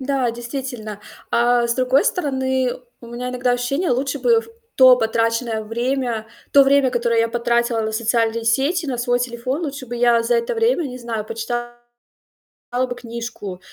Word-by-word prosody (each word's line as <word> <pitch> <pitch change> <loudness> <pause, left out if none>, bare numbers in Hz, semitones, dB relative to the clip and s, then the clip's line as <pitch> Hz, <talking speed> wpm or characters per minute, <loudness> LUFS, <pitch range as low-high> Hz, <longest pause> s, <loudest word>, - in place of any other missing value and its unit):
Да, 265 -2 0
действительно. 235 -3 -6 0.3
А 240 0 +3
с 235 - 0
другой 255 +2 +2
стороны, 260 -5 0 0.3
у 235 - -12
меня 240 +1 -5
иногда 250 0 0
ощущение: 275 +8 -1
лучше 260 +3 0
бы 470 -2 +3
в 455 - -15 0.3
то 255 -1 +8
потраченное 230 0 0
время 235 0 -2 0.3
то 280 -1 +7
время, 275 -1 +4
которое 235 -1 +1
я 230 - +1
потратила 235 0 0
на 220 0 -2
социальные 230 0 0
сети, 280 +9 +1
на 255 -3 -3
свой 245 0 +1
телефон, 250 +5 -3
лучше 280 -4 -5
бы 240 - -6
я 240 -1 +3
за 230 - +1
это 470 +1 0
время, 455 -3 +2
не 255 -3 -6
знаю, 230 -3 -4
почитала 240 +2 -4 1.1
бы 245 - -4
книжку, 230 -6 -7
245 Hz, 165 wpm, -21 LUFS, 230-265 Hz, 1.1 s, то